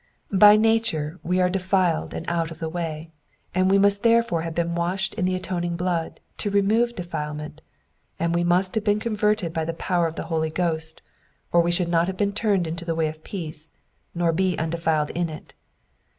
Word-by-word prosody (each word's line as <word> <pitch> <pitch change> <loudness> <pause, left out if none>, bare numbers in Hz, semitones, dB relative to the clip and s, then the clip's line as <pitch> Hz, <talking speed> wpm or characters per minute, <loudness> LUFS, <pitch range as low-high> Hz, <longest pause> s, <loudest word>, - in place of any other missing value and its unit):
By 205 +2 +8
nature 215 -8 +1
we 180 +2 0
are 180 - +4
defiled 185 -2 0
and 165 - -6
out 165 -1 0
of 165 - -9
the 160 - -4
way, 165 -1 -5 0.4
and 185 +1 +2
we 195 - +5
must 200 0 +4
therefore 230 -7 +3
have 165 -1 -5
been 170 0 0
washed 175 +3 -1
in 195 -4 -1
the 185 0 +1
atoning 175 -2 -2
blood 175 -2 -2 0.2
to 205 - -1
remove 215 +4 +2
defile 150 -4 -4
ment, 150 +1 -8 0.6
and 170 0 0
we 170 0 +1
must 180 +2 +2
have 220 - -1
been 205 0 +2
converted 210 -5 0
by 160 - -1
the 165 +1 -3
power 175 0 0
of 165 - -6
the - - -4
Holy 160 -1 -1
Ghost, 160 -1 -2 0.5
or 170 - +5
we 170 - 0
should 175 0 +1
not 170 0 +2
have 190 -1 -4
been 200 0 0
turned 200 -4 +1
into 165 +1 -4
the 165 -1 -2
way 160 -1 +1
of 155 0 -11
peace, 160 -5 -5 0.5
nor 170 -1 +2
be 185 +1 +1
undefiled 160 -2 0
in 170 -1 -1
it. 155 - -10
175 Hz, 205 wpm, -24 LUFS, 165-195 Hz, 0.6 s, By